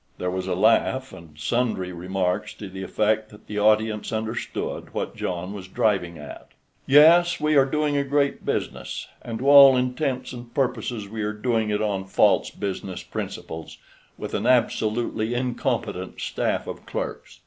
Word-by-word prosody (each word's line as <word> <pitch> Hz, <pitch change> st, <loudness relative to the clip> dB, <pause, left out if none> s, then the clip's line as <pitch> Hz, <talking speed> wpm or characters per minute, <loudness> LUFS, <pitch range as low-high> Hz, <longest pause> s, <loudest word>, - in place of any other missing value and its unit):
There 90 Hz, 0 st, -2 dB
was 95 Hz, 0 st, -3 dB
a -, -, 0 dB
laugh, 130 Hz, -2 st, +2 dB
and 85 Hz, -5 st, -13 dB
sundry 95 Hz, +2 st, -1 dB
remarks 90 Hz, +1 st, -2 dB
to 105 Hz, -, -8 dB
the 95 Hz, 0 st, -8 dB
effect 110 Hz, +3 st, 0 dB
that 105 Hz, -, -16 dB
the 105 Hz, 0 st, -4 dB
audience 110 Hz, 0 st, +2 dB
understood 110 Hz, +1 st, -4 dB
what -, -, -3 dB
John 90 Hz, +2 st, -4 dB
was 95 Hz, -2 st, -8 dB
driving 95 Hz, -4 st, 0 dB
at. 75 Hz, -1 st, -10 dB, 0.4 s
"Yes, 170 Hz, +5 st, +6 dB
we 150 Hz, 0 st, +2 dB
are 135 Hz, -1 st, +6 dB
doing 150 Hz, +1 st, 0 dB
a 140 Hz, -, +2 dB
great 140 Hz, 0 st, 0 dB
business, -, -, -3 dB
and 115 Hz, -1 st, -5 dB
to 130 Hz, +4 st, -3 dB
all 140 Hz, -2 st, +9 dB
intents 130 Hz, 0 st, -1 dB
and 120 Hz, -1 st, -9 dB
purposes 120 Hz, -5 st, -1 dB
we 110 Hz, +2 st, -5 dB
are 105 Hz, 0 st, -1 dB
doing 110 Hz, 0 st, 0 dB
it 105 Hz, 0 st, 0 dB
on 100 Hz, -3 st, -1 dB
false 95 Hz, -, +3 dB
business 95 Hz, -2 st, -5 dB
principles, 80 Hz, 0 st, -6 dB, 0.4 s
and -, -, -18 dB
with -, -, -5 dB
an -, -, -1 dB
absolutely 115 Hz, -1 st, +1 dB
incompetent 120 Hz, -6 st, -2 dB
staff -, -, -1 dB
of -, -, -8 dB
clerks. -, -, -5 dB
110 Hz, 165 wpm, -24 LUFS, 95-130 Hz, 0.4 s, all